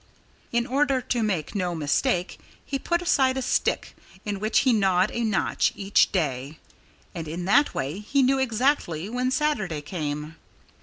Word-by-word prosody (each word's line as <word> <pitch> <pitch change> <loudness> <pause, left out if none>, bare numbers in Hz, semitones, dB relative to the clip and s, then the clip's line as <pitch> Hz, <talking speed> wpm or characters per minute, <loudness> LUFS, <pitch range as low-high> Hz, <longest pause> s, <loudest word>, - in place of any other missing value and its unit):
In 235 0 +1
order 275 +1 +1
to 245 -1 -2
make 190 -8 -1
no 180 -3 -1
mistake, 175 - 0 0.3
he 275 - -3
put 345 +4 -1
aside 265 -6 +2
a 265 - -1
stick - - 0 0.3
in 205 -2 -3
which 215 +2 +2
he 260 -3 +3
gnawed 190 -2 +2
a 235 - -2
notch 215 -4 +1
each 200 0 +2
day. 145 -4 -2 0.6
And 165 -3 -6
in 170 +3 -4
that 285 +10 +3
way 145 +8 -3
he 270 +6 +1
knew 265 +1 +3
exactly 230 - 0
when 250 +2 -1
Saturday 255 - -1
came. 150 -1 -5
210 Hz, 160 wpm, -25 LUFS, 170-260 Hz, 0.6 s, he